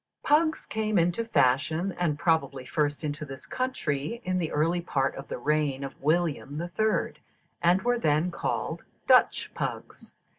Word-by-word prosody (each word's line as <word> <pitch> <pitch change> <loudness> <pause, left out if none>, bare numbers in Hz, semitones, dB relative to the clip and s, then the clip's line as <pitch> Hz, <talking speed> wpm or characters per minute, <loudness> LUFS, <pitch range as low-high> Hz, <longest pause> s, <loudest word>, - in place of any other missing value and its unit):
_ - - -51
Pugs 315 +1 +3
came 215 -1 -1
into 175 +6 +2
fashion, 160 - +2
and 170 -4 -1
probably 155 -6 0
first 145 +3 -1
into 150 0 -3
this 135 -2 -9
country, 230 - -2
in 185 0 0
the 165 -3 -2
early 165 +4 +1
part 135 -5 0
of 135 - -8
the - - -4
reign 150 -3 0
of 135 - -5
William 155 -1 0
the 170 +2 -3
Third, 215 +4 0 0.4
and 175 +2 +3
were 245 0 +2
then 155 -1 +2
called 170 - -3 0.2
Dutch - - +4
pugs. - - -6
160 Hz, 160 wpm, -27 LUFS, 145-185 Hz, 0.4 s, Dutch